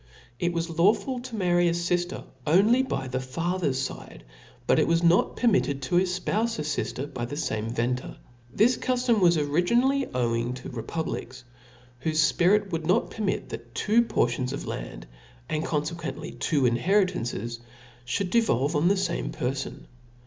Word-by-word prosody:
It 175 - +1
was 165 -1 -3
lawful 210 +7 +3
to 245 -1 -7
marry 175 -3 +2
a 170 - 0
fifter 175 +1 -1 0.2
only 205 - +5
by 135 - -3
the 130 0 -2
fa 165 +8 -2
cer's 135 -4 0
fide, - - -11 0.4
but - - +3
it - - +3
was 165 +1 +2
not 170 +1 +4
permitted 195 - +2
to 175 +7 +1
efpoufe 190 +5 0
a 155 - -2
fifter 145 -2 -2
by 125 -4 -5
the 125 - -6
fame 110 -7 -2
venter 125 +2 -2
f. - - -23 0.3
This 230 - +3
cuftom 250 -3 +1
was 170 -2 +5
ori 150 +2 +1
ginally 260 +8 +2
owing 120 0 0
to 125 - -8
republics, 130 0 -5 0.6
whofe 155 -1 +2
fpirit 195 +3 +3
would 160 -1 -3
not 180 - +2
permit, 210 -3 -2
that - - -9
two 220 +3 +3
portions 125 - 0
of - - -5
land, - - -6 0.4
and 155 0 -1
confequently 165 +2 -4
two 145 -5 +1
inheritances, 120 - 0 0.5
fliould 180 +8 -1
devolve 155 - +2
on 150 +4 +3
the 200 - +4
fame 190 -3 -2
per 125 +1 -2
fon. 135 -1 -6
170 Hz, 165 wpm, -26 LUFS, 130-195 Hz, 0.6 s, only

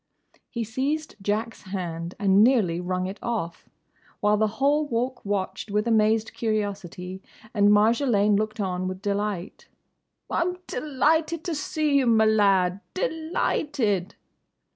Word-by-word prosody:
He 235 -2 -3
seized 275 +8 -2
Jack's 215 +3 -2
hand 175 -3 -5
and 200 0 +4
nearly 210 -9 +3
wrung 185 0 -2
it 190 +3 -6
off, 210 -9 -4 0.5
while 210 0 +3
the 215 +1 +2
whole 290 +2 +2
Walk 250 +1 -2
watched 200 +1 -3
with 210 +2 0
amazed 220 0 +2
curiosity, 195 -4 -3 0.3
and 205 -2 +4
Marjolaine 210 0 +4
looked 215 +1 -1
on 185 -2 -1
with 185 0 -5
delight. 200 -2 -3 0.6
"I'm 360 +1 -1
delighted 310 +4 0
to 345 - -2
see 300 -1 0
you, 265 -3 +2
my 220 -1 +5
lad!—De 215 - +1
lighted!" 205 - 0
215 Hz, 125 wpm, -25 LUFS, 195-260 Hz, 0.6 s, my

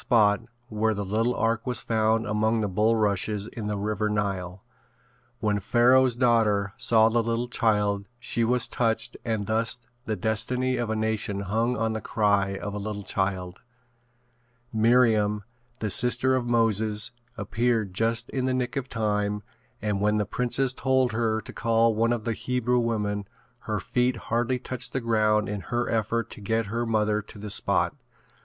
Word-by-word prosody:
spot 110 -4 +3 0.3
where 110 -1 0
the 100 0 -3
little 115 +5 0
ark 115 +2 0
was 125 - 0
found 110 0 +1
among 110 +1 +1
the 105 - 0
bullrushes 105 0 +1
in 110 -3 -6
the 105 -1 -2
River 105 +1 -1
Nile. 95 -3 -3 0.8
When 105 -1 +1
Pharoah's 125 +4 +4
daughter 110 -5 +2
saw 110 -1 +4
the 115 +1 +2
little 115 +1 -1
child 105 -4 +1
she 120 -1 -1
was 120 +1 +2
touched 115 0 -1
and 110 -3 -2
thus 110 +3 +1 0.3
the 110 - -1
destiny 120 +6 0
of 120 -2 -2
a 110 - 0
nation 110 -2 -1
hung 115 +5 0
on 110 0 0
the 110 - -4
cry 100 -3 +1
of 105 +1 -5
a 105 - -4
little 105 0 -5
child. 95 -2 -2 1.1
Miriam, 110 -2 +3 0.3
the 110 -4 -2
sister 125 +4 +3
of 125 -2 -1
Moses 110 -2 +1 0.3
appeared 115 -4 0
just 115 +3 0
in 130 -1 -1
the 130 0 0
nick 125 0 -2
of 135 -1 -3
time 105 -2 -1 0.4
and 105 -2 -1
when 105 +1 +2
the 105 - 0
princess 125 +4 0
told 130 -1 +1
her 110 -1 0
to - - -11
call 115 0 +2
one 115 +2 +1
of 120 -2 -1
the 115 - -1
Hebrew 125 +1 0
women 105 -4 -1 0.4
her - - 0
feet 125 0 0
hardly 120 +3 -1
touched 125 0 -4
the 130 - 0
ground 110 -3 +2
in 105 -1 -4
her 120 +3 -2
effort 115 0 -1
to - - -9
get 110 +3 0
her 120 0 -1
mother 105 -1 +1
to 105 - -14
the 105 0 -6
spot. - - +1
110 Hz, 170 wpm, -26 LUFS, 105-120 Hz, 1.1 s, Pharoah's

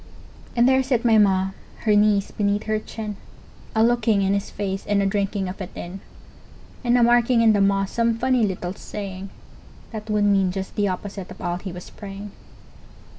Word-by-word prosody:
And 240 +1 +4
there 265 0 +4
sit 255 -3 0
my 225 -2 +6
Ma, 190 -2 +3 0.3
her 215 -2 +3
knees 205 -1 +3
beneath 205 0 0
her 215 0 0
chin, 215 -1 -6 0.6
A 220 - +4
looking 225 -4 +3
in 195 +1 +2
his 200 0 -1
face 195 -1 -3
and 205 -1 +2
a 200 - +2
drinking 195 -1 -1
of 185 +2 -6
it 185 - -5
in, 180 +3 -7 0.8
And 240 0 +3
a 240 - +4
marking 240 0 +4
in 220 -1 +6
the 205 - +2
moss 195 0 +2
some 230 -1 +1
funny 255 0 +2
little 185 -3 -2
saying 195 -1 -7 0.6
That 220 -1 -7
would 210 -1 +2
mean 195 -2 +3
just 190 0 -5
the 205 -1 +1
opposite 190 0 -5
of - - -11
all 175 0 -2
he 185 +1 -7
was 175 0 -10
praying! 200 0 -8
205 Hz, 190 wpm, -23 LUFS, 195-225 Hz, 0.8 s, my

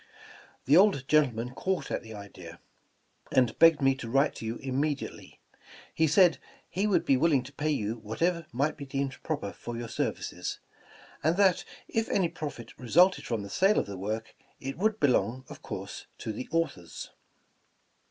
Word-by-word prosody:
The 140 +4 +5
old 185 -8 +5
gentleman 125 -6 +2
caught 190 +5 -2
at - - -1
the 110 -2 -10
idea, 90 -4 -10 0.7
and 125 -3 +2
begged 165 -3 +6
me 135 0 +5
to 115 -4 -6
write 135 +4 +3
to 115 0 -4
vou - - -10
immediate! 140 +2 -1
v. - - -15 0.5
He 160 - +3
said 170 +2 +5 0.3
he 195 +4 -1
would 205 - +2
be 135 - +4
will 165 +5 +3
ing 130 -3 +3
to 135 +3 -12
pay 155 +2 -1
you 115 -6 -1
whatever 165 +10 -1
might 140 +6 0
be 140 - -7
deemed 135 0 -3
proper 145 -11 -3
for 120 -1 -7
your 120 -1 -5
services, - - -3 0.7
and 160 +4 +2
that, 195 -3 +4 0.2
if 225 0 -1
any 185 -4 +2
profit 130 -8 -7
resulted 175 +10 +4
from 115 -4 -2
the 100 - -8
sale 195 - +3
of - - +2
the 100 - -7
work, 110 +4 -4 0.3
it 135 0 -5
would 215 +4 0
belong, 130 -1 +2
of - - -10
course, - - -7
to 110 - -4
the 125 - -6
authors. 160 - -3
135 Hz, 180 wpm, -29 LUFS, 115-165 Hz, 0.7 s, begged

